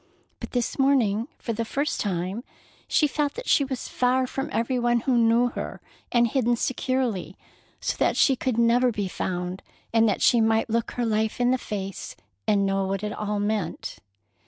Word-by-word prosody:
But -, -, -8 dB
this 245 Hz, +1 st, -1 dB
morning, 240 Hz, -5 st, +3 dB
for 230 Hz, -, -4 dB
the 230 Hz, +1 st, -2 dB
first 280 Hz, +6 st, -2 dB
time, 190 Hz, +3 st, -2 dB, 0.4 s
she 305 Hz, -, +3 dB
felt 290 Hz, 0 st, -1 dB
that -, -, -7 dB
she 285 Hz, -, +4 dB
was 265 Hz, -2 st, -4 dB
far 255 Hz, +1 st, +1 dB
from 270 Hz, +2 st, -4 dB
every 235 Hz, +4 st, 0 dB
one 240 Hz, 0 st, +2 dB
who 255 Hz, +1 st, +1 dB
knew 235 Hz, +1 st, +4 dB
her, -, -, -6 dB, 0.3 s
and 240 Hz, -1 st, +4 dB
hidden 240 Hz, 0 st, +1 dB
securely 240 Hz, -, -1 dB, 0.4 s
so -, -, -2 dB
that -, -, +1 dB
she 270 Hz, -, +5 dB
could 255 Hz, -2 st, -2 dB
never 240 Hz, +2 st, +4 dB
be 205 Hz, -3 st, -2 dB
found, 180 Hz, 0 st, -3 dB, 0.3 s
and 225 Hz, -1 st, +4 dB
that 200 Hz, -, -1 dB
she 240 Hz, -2 st, +5 dB
might 225 Hz, 0 st, +2 dB
look 230 Hz, 0 st, 0 dB
her 245 Hz, -, -1 dB
life 220 Hz, 0 st, 0 dB
in 245 Hz, 0 st, +3 dB
the 255 Hz, -, +1 dB
face 195 Hz, -4 st, -5 dB, 0.3 s
and 200 Hz, -1 st, +3 dB
know 195 Hz, 0 st, 0 dB
what 195 Hz, +1 st, -2 dB
it 210 Hz, 0 st, -2 dB
all 210 Hz, -1 st, -2 dB
meant. 205 Hz, -4 st, -2 dB
230 Hz, 185 wpm, -25 LUFS, 205-250 Hz, 0.4 s, she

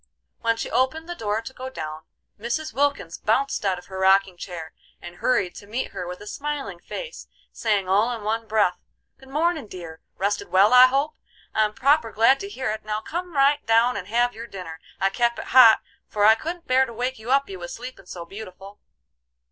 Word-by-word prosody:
When 230 Hz, 0 st, +1 dB
she -, -, -4 dB
opened 315 Hz, +6 st, 0 dB
the 350 Hz, -, -4 dB
door 220 Hz, -7 st, -2 dB
to 230 Hz, -, -8 dB
go 260 Hz, 0 st, -7 dB
down, 155 Hz, -10 st, -7 dB, 0.3 s
Mrs. 240 Hz, +8 st, -3 dB
Wilkins 280 Hz, -12 st, -1 dB
bounced 270 Hz, +5 st, 0 dB
out 190 Hz, -2 st, +1 dB
of 180 Hz, -, -11 dB
her 190 Hz, -1 st, -7 dB
rocking 190 Hz, 0 st, +4 dB
chair 175 Hz, -3 st, -8 dB, 0.3 s
and 175 Hz, 0 st, -10 dB
hurried 215 Hz, -8 st, +1 dB
to 200 Hz, -, -11 dB
meet 235 Hz, +5 st, -3 dB
her 180 Hz, -, -5 dB
with 180 Hz, 0 st, -7 dB
a -, -, -9 dB
smiling 275 Hz, -7 st, -4 dB
face, 485 Hz, -, -8 dB, 0.2 s
saying 205 Hz, -4 st, 0 dB
all 205 Hz, +6 st, +3 dB
in 230 Hz, -3 st, -5 dB
one 225 Hz, +2 st, -2 dB
breath: 205 Hz, -5 st, +2 dB, 0.4 s
"Good 265 Hz, -, -16 dB
mornin', 310 Hz, -1 st, 0 dB
dear! 170 Hz, -4 st, -9 dB, 0.2 s
Rested 200 Hz, +2 st, -1 dB
well, 195 Hz, +5 st, +4 dB
I 250 Hz, 0 st, +10 dB
hope? 280 Hz, +4 st, 0 dB, 0.4 s
I'm 215 Hz, -1 st, +1 dB
proper 275 Hz, -3 st, +3 dB
glad 230 Hz, +6 st, +4 dB
to 400 Hz, -, -6 dB
hear 265 Hz, -, -3 dB
it. 220 Hz, -, -5 dB
Now 215 Hz, 0 st, -3 dB
come 345 Hz, +3 st, -5 dB
right 285 Hz, +1 st, +3 dB
down 230 Hz, +2 st, +4 dB
and 190 Hz, -2 st, -5 dB
have 240 Hz, +3 st, +1 dB
your 230 Hz, +2 st, -8 dB
dinner. 180 Hz, -6 st, -8 dB, 0.2 s
I 195 Hz, 0 st, +2 dB
kep 235 Hz, +2 st, +1 dB
it -, -, -6 dB
hot, 240 Hz, -4 st, +8 dB, 0.3 s
for 205 Hz, -1 st, +1 dB
I 220 Hz, -, +9 dB
couldn't 335 Hz, +9 st, -5 dB
bear 260 Hz, +1 st, +3 dB
to 235 Hz, -, -9 dB
wake 250 Hz, +2 st, -3 dB
you 220 Hz, +2 st, -9 dB
up, 275 Hz, +1 st, +3 dB
you 190 Hz, -2 st, -8 dB
was 175 Hz, 0 st, -7 dB
sleepin' 240 Hz, -6 st, -10 dB
so 170 Hz, -2 st, -7 dB
beautiful." 195 Hz, +1 st, -11 dB
225 Hz, 210 wpm, -24 LUFS, 195-265 Hz, 0.4 s, I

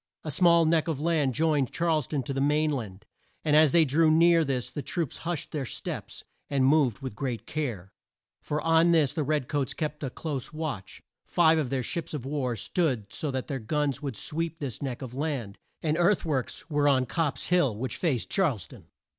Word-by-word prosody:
A 155 Hz, -, -4 dB
small 170 Hz, +2 st, +5 dB
neck 160 Hz, 0 st, +2 dB
of 160 Hz, -4 st, -2 dB
land 150 Hz, -5 st, +1 dB
joined 150 Hz, -4 st, +2 dB
Charles 165 Hz, -5 st, 0 dB
town 145 Hz, -4 st, -2 dB
to 135 Hz, -, -4 dB
the 135 Hz, -, -1 dB
main 150 Hz, +2 st, +2 dB
land, 110 Hz, -7 st, -5 dB, 0.4 s
and 150 Hz, -1 st, +3 dB
as 155 Hz, -2 st, +6 dB
they 170 Hz, -2 st, +5 dB
drew 155 Hz, +3 st, +3 dB
near 165 Hz, +1 st, +5 dB
this 130 Hz, -4 st, -2 dB
the 145 Hz, -, -4 dB
troops 165 Hz, 0 st, -3 dB
hushed 170 Hz, -5 st, -3 dB
their 150 Hz, -3 st, -2 dB
steps, 125 Hz, -, -6 dB, 0.3 s
and 135 Hz, -2 st, +2 dB
moved 135 Hz, -4 st, +3 dB
with 130 Hz, -6 st, -5 dB
great 120 Hz, 0 st, -3 dB
care. 115 Hz, -, -4 dB, 0.5 s
For 150 Hz, -, -2 dB
on 165 Hz, +2 st, +4 dB
this 155 Hz, -5 st, +3 dB
the 160 Hz, -, -1 dB
red 150 Hz, -2 st, 0 dB
coats 145 Hz, -4 st, -1 dB
kept 150 Hz, -2 st, -3 dB
a 135 Hz, -, -1 dB
close 135 Hz, -1 st, -5 dB
watch. 155 Hz, -11 st, -5 dB, 0.2 s
Five 160 Hz, -2 st, +4 dB
of 140 Hz, -5 st, -1 dB
their 130 Hz, -1 st, -1 dB
ships 165 Hz, +4 st, -4 dB
of 135 Hz, -4 st, -5 dB
war 135 Hz, -4 st, -1 dB
stood 115 Hz, -, -1 dB
so 150 Hz, -, -3 dB
that 130 Hz, -2 st, -2 dB
their 135 Hz, -3 st, -4 dB
guns 140 Hz, +3 st, -1 dB
would 135 Hz, -7 st, -4 dB
sweep 165 Hz, +5 st, -3 dB
this 135 Hz, -7 st, -5 dB
neck 135 Hz, -2 st, -4 dB
of 125 Hz, -2 st, -7 dB
land, 135 Hz, -8 st, -3 dB, 0.2 s
and 155 Hz, -1 st, +1 dB
earth 175 Hz, +2 st, +3 dB
works 145 Hz, -1 st, -2 dB
were 145 Hz, -2 st, +1 dB
on 130 Hz, -2 st, +3 dB
Copp's 155 Hz, +3 st, -1 dB
Hill, 170 Hz, -11 st, +3 dB
which 125 Hz, 0 st, -3 dB
faced 145 Hz, -10 st, 0 dB
Charles 145 Hz, -, +1 dB
town. -, -, -15 dB
145 Hz, 205 wpm, -27 LUFS, 130-160 Hz, 0.5 s, as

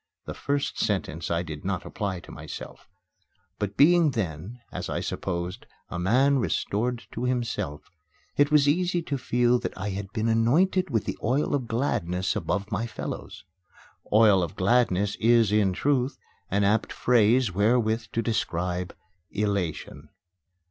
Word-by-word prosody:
The -, -, -5 dB
first 140 Hz, 0 st, -2 dB
sentence 80 Hz, +4 st, -1 dB
I 85 Hz, 0 st, 0 dB
did 75 Hz, -3 st, -7 dB
not -, -, -2 dB
apply 95 Hz, -4 st, -3 dB
to -, -, -13 dB
myself; -, -, -9 dB, 0.7 s
but 100 Hz, -1 st, -3 dB
being 165 Hz, +2 st, +6 dB
then, 100 Hz, -, -4 dB
as -, -, -5 dB
I -, -, -1 dB
supposed, 85 Hz, +2 st, -4 dB, 0.2 s
a 85 Hz, -, -4 dB
man 130 Hz, +9 st, +3 dB
restored 115 Hz, +4 st, -1 dB
to 125 Hz, -, -3 dB
himself, 120 Hz, -, -3 dB, 0.4 s
it 145 Hz, 0 st, +4 dB
was 150 Hz, -2 st, +4 dB
easy 175 Hz, +3 st, +1 dB
to 140 Hz, -3 st, -2 dB
feel 125 Hz, 0 st, +2 dB
that -, -, -5 dB
I 100 Hz, +2 st, -3 dB
had 100 Hz, +1 st, -5 dB
been 110 Hz, 0 st, -1 dB
anointed 155 Hz, +12 st, +2 dB
with 115 Hz, -6 st, 0 dB
the -, -, -4 dB
oil 130 Hz, +7 st, +1 dB
of 130 Hz, -4 st, -1 dB
gladness 95 Hz, -7 st, -1 dB
above 100 Hz, +1 st, -2 dB
my 110 Hz, +4 st, -1 dB
fellows. 115 Hz, -, -7 dB, 0.7 s
"Oil 105 Hz, -3 st, +6 dB
of 85 Hz, -3 st, -3 dB
gladness" 100 Hz, -2 st, +2 dB
is, 115 Hz, -2 st, +4 dB
in 105 Hz, -3 st, +3 dB
truth, 135 Hz, +6 st, 0 dB, 0.3 s
an 100 Hz, +1 st, +1 dB
apt 105 Hz, +2 st, +2 dB
phrase 120 Hz, -2 st, +3 dB
wherewith 110 Hz, +3 st, +2 dB
to 115 Hz, -, 0 dB
describe 90 Hz, -5 st, -2 dB, 0.3 s
elation. 90 Hz, -7 st, -3 dB
110 Hz, 150 wpm, -26 LUFS, 95-125 Hz, 0.7 s, being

